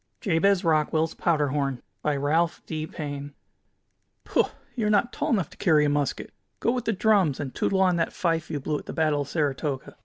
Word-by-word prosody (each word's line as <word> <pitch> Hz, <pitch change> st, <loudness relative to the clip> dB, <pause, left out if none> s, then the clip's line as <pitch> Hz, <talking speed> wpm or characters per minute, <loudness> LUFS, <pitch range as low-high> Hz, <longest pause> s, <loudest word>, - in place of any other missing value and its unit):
JABEZ 195 Hz, -1 st, +2 dB
ROCKWELL'S 160 Hz, 0 st, +2 dB
POWDER 150 Hz, -4 st, +1 dB
HORN 135 Hz, -3 st, -2 dB, 0.2 s
By 150 Hz, -1 st, 0 dB
Ralph 160 Hz, +4 st, +1 dB
D. 155 Hz, -1 st, -4 dB
Paine 145 Hz, -2 st, -6 dB, 0.9 s
"Pooh, -, -, +2 dB, 0.3 s
you 225 Hz, -4 st, 0 dB
are -, -, +2 dB
not 215 Hz, +3 st, +2 dB
tall -, -, -2 dB
enough 190 Hz, -, +1 dB
to -, -, -15 dB
carry 155 Hz, -4 st, +4 dB
a -, -, +2 dB
musket! 145 Hz, -1 st, -1 dB, 0.3 s
Go 230 Hz, -, +2 dB
with 245 Hz, -1 st, -2 dB
the -, -, +2 dB
drums, 195 Hz, -, +2 dB
and 135 Hz, -3 st, -4 dB
tootle 190 Hz, -1 st, +1 dB
on 180 Hz, -2 st, +3 dB
that 165 Hz, -, 0 dB
fife 165 Hz, -2 st, -1 dB
you 150 Hz, -3 st, -2 dB
blew 150 Hz, +2 st, -2 dB
at -, -, -14 dB
the -, -, -5 dB
Battle 155 Hz, -3 st, +1 dB
of 140 Hz, -, -4 dB
Saratoga. 145 Hz, -3 st, -2 dB
155 Hz, 205 wpm, -26 LUFS, 145-180 Hz, 0.9 s, carry